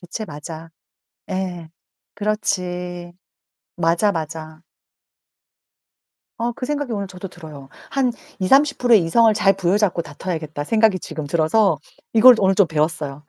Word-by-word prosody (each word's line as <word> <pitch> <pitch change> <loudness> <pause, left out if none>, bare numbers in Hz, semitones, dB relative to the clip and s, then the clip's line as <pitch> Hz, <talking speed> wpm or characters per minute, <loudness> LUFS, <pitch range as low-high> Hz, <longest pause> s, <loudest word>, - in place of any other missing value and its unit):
그치 190 +5 -6
맞아. 160 0 -9 0.6
예. 180 -3 -4 0.5
그렇지. 180 -4 -3 0.6
맞아. 170 +4 +2
맞아. 160 -1 -6 1.8
어 235 +1 -1
그 250 - -6
생각이 290 -4 -2
오늘 200 -2 -3
저도 190 0 -9
들어요. 155 -6 -12 0.2
한 260 -3 +1 0.3
20~30% 250 +4 +3
의 205 - +6
이성을 225 +7 +4
잘 205 -2 +4
부여잡고 190 -1 +1
다퉈야겠다 155 -1 -5
생각이 215 +1 +3
지금 155 -4 -6
들어서 165 +4 +2 0.4
이걸 245 +3 +8
오늘 195 -1 +3
좀 200 -2 +4
배웠어요. 150 -2 -2
180 Hz, 255 characters per minute, -21 LUFS, 160-215 Hz, 1.8 s, 이걸